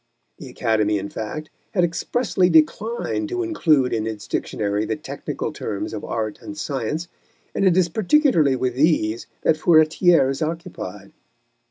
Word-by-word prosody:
The - - -9
Academy, 105 -2 +1
in 100 0 -4
fact, 155 +8 -6 0.2
had 180 - +3
expressly 180 +2 +1
declined 215 - +1
to 365 0 -1
include 155 - +2
in 110 -1 -1
its 110 -2 -6
Dictionary 105 0 -1
the 110 - -2
technical - - -5
terms 100 0 -4
of 105 - -5
art 110 -2 -3
and 155 - -8
science, 150 +3 -3 0.5
and - - +1
it 185 -1 +4
is 185 -2 +4
particularly 180 - +3
with 130 -1 -1
these 125 -6 +1 0.2
that 155 - +3
Furetière 160 -2 +4
is 135 - -5
occupied. 165 +2 -5
155 Hz, 150 wpm, -22 LUFS, 110-175 Hz, 0.5 s, it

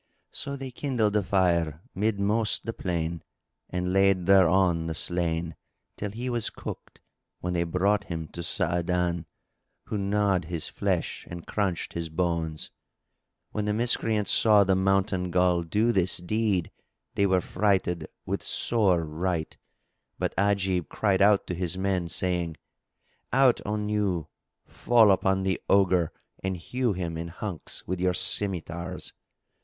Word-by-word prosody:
So 140 - -4
they 135 -1 -6
kindled 120 -6 0
a 105 - +4
fire 85 -4 +1
midmost 105 +2 +1
the 115 - -3
plain 85 -4 -3 0.5
and 90 0 -2
laid 95 -2 +3
thereon 90 -3 +4
the 80 - -3
slain, 85 -2 -1 0.4
till 105 - -4
he 120 +5 -5
was 120 -3 0
cooked, - - -9 0.4
when 90 0 -3
they 85 -1 +1
brought 100 +4 +1
him 80 -2 -5
to 85 - -7
Sa'adan, 85 0 0 0.6
who 105 - -3
gnawed 100 -2 +1
his 85 -1 -4
flesh - - -2
and 85 -1 -8
crunched 95 -5 -2
his 85 -1 -4
bones. 80 -1 -2 0.8
When 105 - -2
the 105 - 0
Miscreants 110 -2 +2
saw 105 -2 +6
the 95 0 +2
Mountain 95 -1 +1
Ghul 90 -2 +2
do 110 +6 +2
this 95 -4 +1
deed 100 -1 0 0.4
they 100 - +2
were 95 -1 +3
affrighted 90 -3 0 0.2
with - - -2
sore 95 -8 +2
affright, 80 +1 -3 0.6
but - - -1
Ajib 95 -5 +1
cried 100 -3 +1
out 100 0 +5
to - - -4
his 90 0 -2
men, 95 -2 0
saying, 85 -2 -2 0.7
"Out 130 -2 +4
on 105 0 -1
you! 100 -6 -1 0.4
Fall 115 -4 +4
upon 95 0 +2
the 95 -1 -1
Ogre 95 -4 +3 0.3
and 95 -1 -2
hew 125 +6 -1
him 85 -3 -4
in 85 - -4
hunks 90 0 -5
with 90 0 -3
your 90 0 +2
scymitars!" 85 -4 -1
95 Hz, 140 wpm, -27 LUFS, 85-105 Hz, 0.8 s, saw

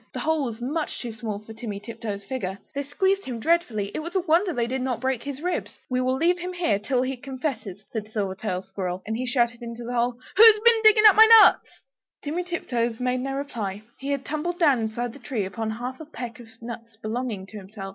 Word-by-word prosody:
The - - -4
hole 315 -3 +1
was 230 -2 -5
much 295 +6 -3
too 240 - -5
small 220 -2 -4
for 215 +2 -11
Timmy 215 -2 -6
Tiptoes' 210 -2 -6
figure. 195 -6 -4 0.2
They 280 - -2
squeezed 380 +8 0
him 245 -3 -5
dreadfully, 225 -9 +1
it - - -3
was 340 +4 -7
a - - +4
wonder 350 +3 +2
they 240 -6 0
did 260 +2 -2
not 255 -2 -1
break 260 -1 -1
his 285 +1 -6
ribs. 360 0 -3
"We 255 0 +1
will 255 +1 +1
leave 345 +5 +2
him 360 +1 -5
here 335 - +1
till 250 +4 0
he 265 +1 -2
confesses," 250 - -5
said 220 -3 -3
Silvertail 195 -2 -2
Squirrel, 190 -1 -4
and 220 +1 -2
he 255 +2 -3
shouted 240 -2 +1
into 235 0 -7
the 240 +1 -5
hole 240 0 0 0.2
"Who's 440 0 +9
been 465 -1 +5
digging 430 0 +7
up 420 - +9
my 445 0 +9
nuts?" - - +3 0.4
Timmy 310 +5 -2
Tiptoes 240 -10 -2
made 250 0 0
no 270 +1 -3
reply; 220 -8 -4 0.2
he 275 - -5
had 280 -1 -1
tumbled 310 +3 -3
down 290 -8 +4
inside 225 +2 -3
the 280 - -12
tree, 235 -5 -3
upon 220 +3 -4
half 245 +4 -5
a 315 - -8
peck 250 -6 -7
of 240 - -12 0.2
nuts 230 -1 -8
belonging 225 -3 -3
to 215 +2 -10
himself. 195 0 -8
245 Hz, 225 wpm, -25 LUFS, 220-290 Hz, 0.4 s, Who's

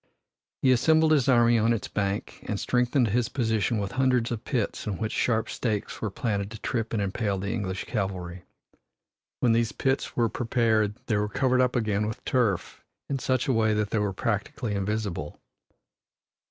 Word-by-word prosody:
He 130 - +5
assembled 160 +5 +4
his 140 -4 +3
army 120 -2 +5
on 115 +2 +3
its 115 - -3
bank 100 +1 -3
and 105 - -2
strengthened 125 -1 +2
his 120 +3 +1
position 110 -3 0
with 100 -2 -2
hundreds 130 -3 +1
of 115 -1 -3
pits 120 -5 -2
in 100 -4 -2
which 110 +3 -2
sharp 115 -1 +1
stakes 110 -4 -3
were 110 - -1
planted 100 -1 -2
to 110 - -8
trip 115 +1 -2
and 115 - -1
impale 100 0 -1
the 100 +3 -3
English 95 -3 -3
cavalry. 95 -5 -3 1.0
When 120 - +4
these 115 0 +2
pits 135 0 -1
were 120 -1 +3
prepared 110 -3 +1
they 110 - +1
were 105 0 0
covered 130 +3 +2
up 125 -1 +1
again 105 -3 0
with 110 - -6
turf 115 -8 0 0.3
in 135 - 0
such 130 +2 0
a 135 - +2
way 110 -2 +2
that 105 -1 -1
they 110 - +1
were 105 -1 0
practically 110 +3 -2
invisible. 100 -6 -3
110 Hz, 180 wpm, -27 LUFS, 105-125 Hz, 1.0 s, He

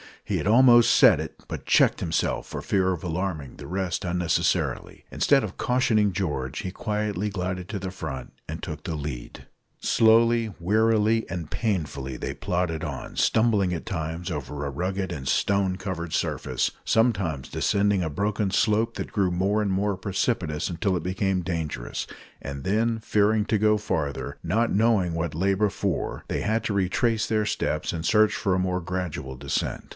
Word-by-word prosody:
He - - -1
had - - -2
almost 120 +1 +7
said - - +7
it, - - -7
but - - -6
checked - - +4
himself - - -1
for - - -5
fear 95 -2 +1
of 85 - -7
alarming 85 -5 -3
the - - -9
rest 95 0 -2
unnecessarily. 90 -1 0
Instead - - +3
of - - -6
cautioning 115 -5 +2
George, 75 -9 -2
he 90 - -4
quietly 105 0 -2
glided 90 -2 -3
to 105 - -3
the 95 0 -5
front, 80 -8 -6 0.2
and 80 +1 -6
took 75 -3 -6
the 85 -4 -2
lead. 70 -5 -6 0.4
Slowly, 115 -1 +4
wearily, 110 +4 +2
and 85 -4 -5
painfully 75 - -2
they - - -4
plodded 90 -3 -2
on, 70 -4 -6
stumbling 105 -5 +3
at 85 - -4
times 80 -2 -4
over 75 -1 -4
a - - -2
rugged 95 +5 -2
and 70 -6 -5
stone 100 +1 +2
covered 85 -4 -5
surface, - - -1
sometimes 95 - +1
descending 100 -1 +1
a 80 - -1
broken 100 +4 -1
slope 110 +3 +2
that 100 - -5
grew 95 -3 +1
more 100 +4 +1
and 105 - 0
more 100 +1 0
precipitous 95 -5 -1
until 95 +2 0
it 85 - -2
became 95 0 0
dangerous, 80 -8 -4 0.3
and 70 -1 -6
then, 110 +4 +1
fearing 105 0 +2
to 110 - +1
go 105 0 +4
farther 80 -9 -3
not 115 +2 +1
knowing 100 -4 +2
what 80 -2 -2
lay 95 +4 +2
before 100 -3 -1
they - - -1
had 110 +2 0
to 105 - -1
retrace 105 +4 +1
their 110 -1 +1
steps 75 -6 -1
and 80 -1 -4
search 110 -1 +4
for 95 -4 0
a - - +1
more 90 0 0
gradual 90 -7 -4
descent. 70 +1 -3
95 Hz, 170 wpm, -25 LUFS, 85-105 Hz, 0.4 s, almost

